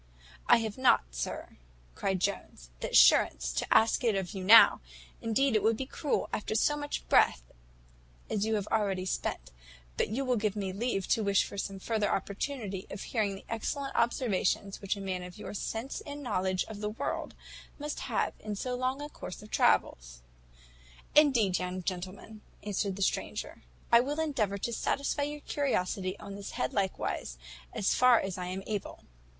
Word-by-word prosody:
"I 240 - +7
have 225 +1 -4
not, 260 - +5
sir," - - -5 0.4
cried 190 - -1
Jones, 120 - -3
"the - - -3
assurance - - +5
to - - -2
ask 225 +2 +4
it 225 -4 +2
of 190 0 -3
you 190 -2 -5
now; 225 +4 +8 0.4
indeed 230 +3 +2
it 215 - +4
would 220 +2 +2
be 265 - -3
cruel, 280 +2 -1
after 215 - -2
so 295 +6 +3
much 290 0 -4
breath - - +4 0.8
as 205 - -1
you 220 0 +1
have 205 -2 -1
already 195 -4 +1
spent: 185 - -3 0.5
but - - +1
you 260 +6 -2
will 250 -2 +1
give 210 -1 0
me 195 -2 -3
leave 200 -2 -1
to 225 - +2
wish 200 -1 +3
for - - -8
some 195 0 -4
further 210 +1 -1
opportunity 200 0 -3
of 195 - -7
hearing 210 -4 -1
the 195 - -12
excellent 270 +5 -3
observations 210 -4 0
which 195 0 -1
a - - -8
man 190 -2 -3
of 180 +2 -9
your 210 - -7
sense 225 +5 -4
and 290 0 -7
knowledge 185 -6 0
of 210 -2 -9
the 210 - -1
world 215 - -4 0.4
must 295 0 -4
have - - -1
made - - -23
in 210 -1 -3
so 250 +5 -3
long 255 +3 -1
a - - -4
course 210 -9 -9
of 215 - -14
travels." - - +1 0.9
"Indeed, 240 - +4
young 180 0 -4
gentleman," 190 +4 -6 0.2
answered 200 -1 -1
the 200 - -1
stranger, - - -2 0.3
"I 235 - +8
will 285 +5 -1
endeavour 235 -11 0
to 235 +4 -3
satisfy 280 +5 -1
your 295 0 -7
curiosity 190 -10 -1
on 200 - -9
this 200 0 -7
head 130 - -2
likewise, 190 - -2 0.3
as 195 - +1
far 250 -2 +6
as 190 -1 -4
I 180 - -4
am 185 +1 -4
able." 210 -2 -5
205 Hz, 180 wpm, -30 LUFS, 190-240 Hz, 0.9 s, now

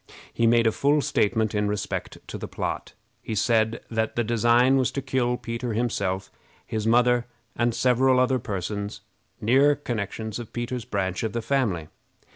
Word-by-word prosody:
He 115 - +2
made 115 0 +4
a 110 - +4
full 145 +5 +2
statement 110 -6 +1
in 105 -1 +1
respect 105 -1 -3
to - - -6
the - - -5
plot. - - -4 0.3
He 110 - -4
said 110 +1 +2
that 110 -1 -1
the 120 - +1
design 120 +3 +4
was 130 -2 +2
to - - -1
kill 125 -2 0
Peter 115 0 -4
himself, 100 -5 -1 0.3
his 110 -1 -3
mother, 120 +1 +3 0.3
and 120 -1 +1
several 130 +1 +3
other 130 0 +2
persons, 100 0 -4 0.4
near 135 +6 +4
connections 110 -4 -4
of 120 - -9
Peter's 120 0 -3
branch 95 -1 -2
of 110 -3 -2
the 120 - -1
family. 110 - 0
115 Hz, 165 wpm, -25 LUFS, 105-125 Hz, 0.4 s, made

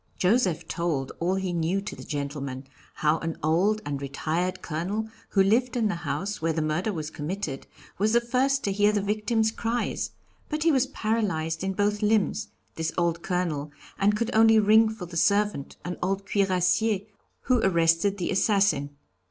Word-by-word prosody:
Joseph 185 -3 +2
told 165 -6 -2
all 180 +3 +1
he 190 -2 -2
knew 170 +3 0
to 205 - -6
the - - -10
gentleman 140 -2 -4 0.3
how 155 +1 +2
an 165 -1 -4
old 195 +8 +2
and 140 -1 -3
retired 160 +6 -2
Colonel, 185 +8 -2 0.2
who 195 - +4
lived 240 +5 +2
in 220 -3 +2
the - - 0
house 195 +3 -3
where 165 0 +1
the 160 - -1
murder 155 +7 0
was 155 -4 -5
committed, 155 -3 -4 0.3
was 215 +2 +2
the 235 - +6
first 260 +3 +1
to 200 - 0
hear 205 +1 +3
the 205 -2 0
victim's 220 +2 +1
cries; 230 +1 -2 0.4
but 305 0 -1
he 330 - +4
was 270 -2 +2
paralyzed 190 - -1
in 190 0 -1
both 205 +2 0
limbs, 215 -1 +1 0.3
this 160 0 -2
old 170 -1 +1
Colonel, 170 -6 -2 0.3
and 205 +2 +3
could 230 +1 -2
only 225 0 +6
ring 220 +1 +5
for 220 -4 -6
the 170 -1 -7
servant, 200 -5 +1
an 180 0 -3
old 195 +2 -1
cuirassier, 195 +2 +2 0.4
who 255 -2 +2
arrested 170 0 +2
the 180 - -2
assassin. 195 -8 +2
195 Hz, 175 wpm, -26 LUFS, 165-215 Hz, 0.4 s, the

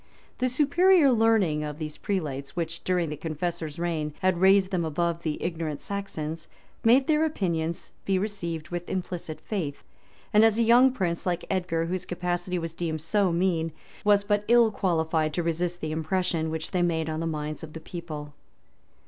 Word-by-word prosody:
The 255 0 +2
superior 300 +4 +5
learning 220 -10 +3
of 150 -1 -5
those 155 -2 -6
prelates, 145 -8 -3
which, 170 -1 -3
during 180 -3 +1
the 150 - -3
Confessor's 160 0 -4
reign, 160 -3 -2
had 185 -2 +2
raised 190 0 +5
them 180 -3 0
above 170 +2 -1
the 155 -3 -2
ignorant 165 -4 -3
Saxons, 165 -6 -5 0.4
made 250 +4 +5
their 310 +1 +3
opinions 170 - -2
be 195 -1 +1
received 175 -6 -3
with 175 0 -5
implicit 175 -4 -4
faith; 165 -10 -4 0.5
and 210 +1 +7
a 225 - +8
young 240 +3 +6
prince; 180 -8 -2
like 175 -1 -1
Edgar, 175 -3 0
whose 180 +1 -3
capacity 175 0 -2
was 165 -1 -4
deemed 160 -2 -3
so 195 +2 +2
mean, 170 -2 0 0.3
was 205 -1 +4
but 205 0 +1
ill 235 -1 +5
qualified 160 -5 0
to 175 - 0
resist 175 +1 -1
the 155 - -3
impression 160 0 0
which 160 0 -4
they 180 - +1
made 165 -2 +1
on 155 0 -2
the 165 - -2
minds 150 0 -4
of 155 -1 -8
the 160 - -6
people. 155 -3 -7
170 Hz, 175 wpm, -27 LUFS, 160-195 Hz, 0.5 s, a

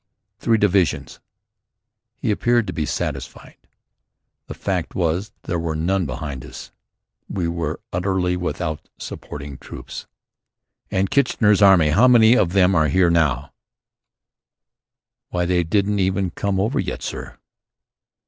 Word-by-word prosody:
"Three 115 +1 +2
divisions." 95 -5 +1 1.0
He - - -1
appeared 120 +2 +2
to 90 - -5
be 75 -2 -2
satisfied. - - -5 0.9
The - - -7
fact - - -3
was, 90 +4 -1
there 85 - -2
were 80 -1 -2
none 90 +2 0
behind 70 -1 -5
us. - - -10 0.6
We 90 -3 -2
were 85 0 -3
utterly 90 0 0
without 85 -3 -4
supporting 70 -1 -8
troops. - - -9 0.8
"And 95 0 0
Kitchener's 110 -6 +3
Army? 95 -6 +6
How 105 +12 +5
many 120 -1 +6
of 90 -8 +2
them 95 -1 +4
are 80 -4 +3
there 90 +2 +3
here?" 75 -5 +1 1.8
"Why, 90 -1 -1
they 90 0 +1
haven't 100 +4 +1
even 95 -1 0
come 100 +3 -1
over 105 +6 0
yet, - - -3
sir." - - -6
90 Hz, 130 wpm, -21 LUFS, 80-100 Hz, 1.8 s, Army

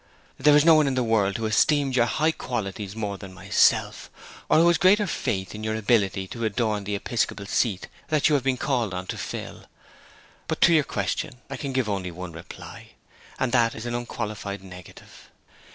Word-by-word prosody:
'There 150 -1 +6
is 150 - +4
no 165 - +8
one 155 -2 +4
in 135 - 0
the 130 - +1
world 105 -4 +1
who 115 - -3
esteems 135 +5 +2
your 120 -2 +3
high 155 +6 +1
qualities 105 -7 -5
more 100 -3 -4
than 100 -2 -9
myself, 95 - +1 0.4
or - - +5
who 165 +2 +5
has 170 - +3
greater 205 +3 +5
faith 95 - -3
in 105 0 -7
your 110 0 -1
ability 100 -3 +1
to 115 +4 -6
adorn 110 -2 -1
the 105 0 -2
episcopal 100 -1 -2
seat 100 -2 0 0.2
that 155 -2 +2
you 150 - +2
have 140 -3 +2
been 130 -1 +1
called 120 -8 -1
on 90 0 -4
to - - -5
fill. - - -7 0.8
But - - -2
to 170 - +6
your 155 -3 +4
question 130 -5 -3
I - - -3
can 140 -2 -4
give 130 -3 0
only 95 -3 -2
one 90 +1 -7
reply, 80 0 -11 0.4
and 130 - -1
that 115 -3 +2
is 110 - -7
an 120 - -3
unqualified 105 -4 -5
negative. 90 -2 -13
115 Hz, 200 wpm, -25 LUFS, 100-135 Hz, 0.8 s, no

